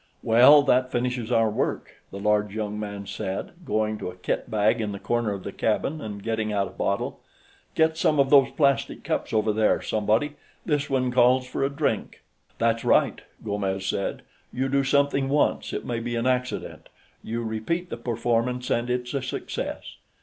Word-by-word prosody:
"Well, 130 +6 +7
that 130 -2 +2
finishes 125 -1 -2
our 115 -2 +3
work," - - -3
the 100 - -8
large 105 0 +1
young 105 -1 -3
man 100 -1 -5
said, 95 0 -4
going 110 -4 -1
to - - -4
a 90 - -10
kitbag 110 +4 0
in 105 -2 -2
the 100 - -6
corner 120 -1 0
of 100 -2 -5
the - - -5
cabin 135 +10 -1
and 100 -4 -7
getting 110 -1 -1
out 100 -1 +1
a - - -11
bottle. 100 - -2 0.6
"Get 160 0 +3
some 155 -2 +2
of 135 -1 +3
those 140 -2 +7
plastic 140 -5 +1
cups, - - -2
over 110 -1 +1
there, 110 0 +2
somebody; 110 +8 0 0.3
this 150 -2 0
one 130 -2 +1
calls 125 +1 +4
for 130 +1 -3
a 135 - +2
drink." 140 - -2 0.3
"That's 115 0 +1
right," - - +3 0.2
Gomes 100 -2 -2
said. 100 +1 -2 0.3
"You 130 +2 -1
do 140 0 +2
something 140 0 +2
once, 145 +1 +1
it - - -4
may 120 -1 -2
be 120 +1 -3
an 115 +1 -1
accident; 125 0 -2 0.3
you 115 +1 -3
repeat 115 +11 -3
the - - -3
performance, 120 +1 -1
and 120 +1 0
it's 125 +1 -2
a 140 - -1
success." 125 - -5
115 Hz, 180 wpm, -25 LUFS, 105-130 Hz, 0.6 s, Well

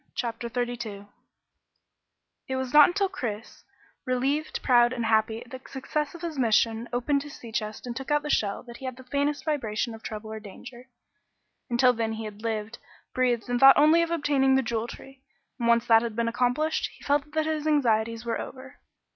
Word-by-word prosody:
CHAPTER 235 0 -3
32 240 -4 -4 1.4
It 265 - -2
was 260 0 -3
not 295 -1 +9
until 395 +2 0
Chris, 230 - -6 0.4
relieved, 270 +4 -1
proud 240 -1 +4
and 235 -2 -2
happy 220 0 +1
at 240 - -20
the 260 -1 -8
success 295 +3 -3
of 340 - -11
his 320 -5 -4
mission, 230 0 +2
opened 265 +4 0
his 290 0 -9
sea 230 - -11
chest 215 0 -4
and 240 -1 -5
took 270 +3 -6
out 295 0 +2
the 300 - -4
shell 200 -2 0
that 235 -1 -11
he 265 - -9
had 255 -1 -5
the 260 - -11
faintest 285 +3 -1
vibration 235 -7 -1
of 225 - -10
trouble 215 0 -7
or 220 - -5
danger. 240 +4 -12 0.8
Until 250 +1 +4
then 225 -1 -2
he 220 0 -5
had 210 0 -9
lived, 220 0 -3 0.3
breathed, 245 -2 +1
and 245 0 0
thought 270 +1 +8
only 310 +3 +6
of 335 - 0
obtaining 285 -5 +2
the 265 - +2
Jewel 230 -1 -2
Tree, 270 +2 -12 0.4
and 235 - 0
once 235 0 +4
that 225 -1 +6
had 230 -2 -4
been 235 0 0
accomplished, 250 +7 0
he - - -17
felt 290 +1 0
that 315 0 +1
his 310 -1 -2
anxieties 230 -6 +1
were 230 - -2
over. 265 +1 -10
245 Hz, 195 wpm, -27 LUFS, 230-280 Hz, 1.4 s, not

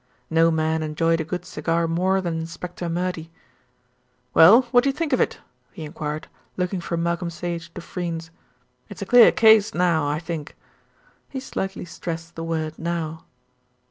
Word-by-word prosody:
No 165 +1 +4
man 160 0 0
enjoyed 165 +1 +1
a - - -1
good 180 +2 -5
cigar 170 -2 -1
more 185 +3 +1
than 170 -3 -2
Inspector 175 +2 -6
Murdy. 175 -1 -3 1.0
"Well, 215 +11 +8
what 245 0 +5
do 275 - +2
you - - 0
think 315 -3 -2
of 255 - +3
it?" - - 0 0.4
he 160 - -8
enquired, 150 0 -5 0.3
looking 180 0 -1
from 170 0 -2
Malcolm 170 0 -1
Sage 170 0 -5
to 175 - -6
Freynes. 165 -2 -5 0.6
"It's - - -7
a - - -6
clear 240 +3 +7
case 220 -1 +5
now, 170 -4 +2
I 145 +1 0
think." 165 -2 -6 0.7
He 265 - -5
slightly 195 -8 -4
stressed 165 -1 -6
the 165 - -6
word 160 -1 -3
"now." 165 -1 -3
170 Hz, 165 wpm, -23 LUFS, 165-180 Hz, 1.0 s, Well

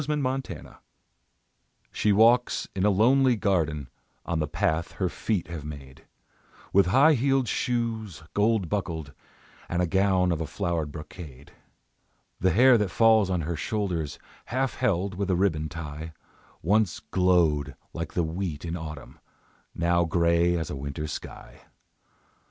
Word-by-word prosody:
THE 150 +2 -1
OLD 150 -1 -1 0.3
MAID - - -7 1.3
She 105 - +1
walks 115 +4 +4
in 95 - -1
a 105 - +5
lonely 125 +6 +4
garden 80 - 0 0.4
On 85 -1 -1
the 75 - -1
path 80 +2 -1
her 95 -2 -1
feet 100 -1 -2
have 85 -4 -6
made, 70 -3 -10 0.7
With 100 -1 +5
high 140 +11 +5
heeled 135 -1 +1
shoes, 110 - -2
gold 105 -2 +2
buckled, 80 -7 -3 0.6
And 90 -1 0
gown 95 -2 +3
of 85 -1 -1
a 80 - -3
flowered 80 -2 -2
brocade; 75 -3 -10 0.9
The 95 - +3
hair 125 +4 +6
that 105 -2 0
falls 110 0 +4
on 90 -2 0
her 85 +2 -3
shoulders, 85 -5 -2 0.3
Half 130 +2 -1
held 100 -5 0
with 100 +1 -3
a 90 - +3
ribbon 80 -5 0
tie, 80 0 -7 0.5
Once 105 +1 +2
glowed 80 -7 +2 0.2
like 85 -2 -5
the 85 - +2
wheat 80 -1 -4
in 85 0 -3
autumn, 75 -6 -8 0.6
Now 85 0 +2
grey 85 +1 +2
as 80 -1 -4
a - - -4
winter 70 +2 -5
sky. 75 - -8
90 Hz, 145 wpm, -26 LUFS, 80-105 Hz, 1.3 s, hair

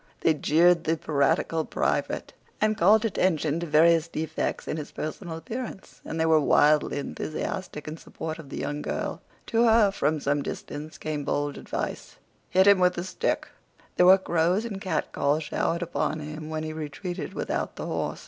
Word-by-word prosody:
They 160 - +4
jeered 170 +3 +3
the 160 +1 +1
piratical 155 +2 +1
private, - - -1 0.3
and 215 0 +2
called 210 +5 +5
attention 165 -7 +1
to 170 - -4
various 160 +2 +4
defects 160 -1 -3
in - - -2
his 150 -1 -6
personal 160 +2 -5
appearance; 220 +4 -7
and 160 - -5
they 160 - +3
were 160 -1 +5
wildly 150 0 +3
enthusiastic 150 +2 -4
in 155 +1 -5
support 160 0 -6
of 150 -4 -10
the - - -6
young 145 +1 -3
girl. - - -3 0.2
To 230 +1 +2
her, 220 -3 +5
from 155 -5 0
some 145 +1 0
distance, 150 +2 -6
came 150 -2 -3
bold 145 0 -1
advice. - - -5 0.3
"Hit 190 +1 +4
him 200 -1 +7
with 180 0 +3
a 175 - -2
stick." 185 - -1 0.5
There 180 - +5
were 190 +1 +9
crows 180 +3 +1
and 200 -4 -5
catcalls 155 -6 0
showered 170 +3 -1
upon 160 -2 -2
him 155 +1 -7
when 155 0 -3
he 155 0 -4
retreated 160 +4 -5
without - - -2
the - - -5
horse. - - -3
160 Hz, 175 wpm, -26 LUFS, 150-185 Hz, 0.5 s, were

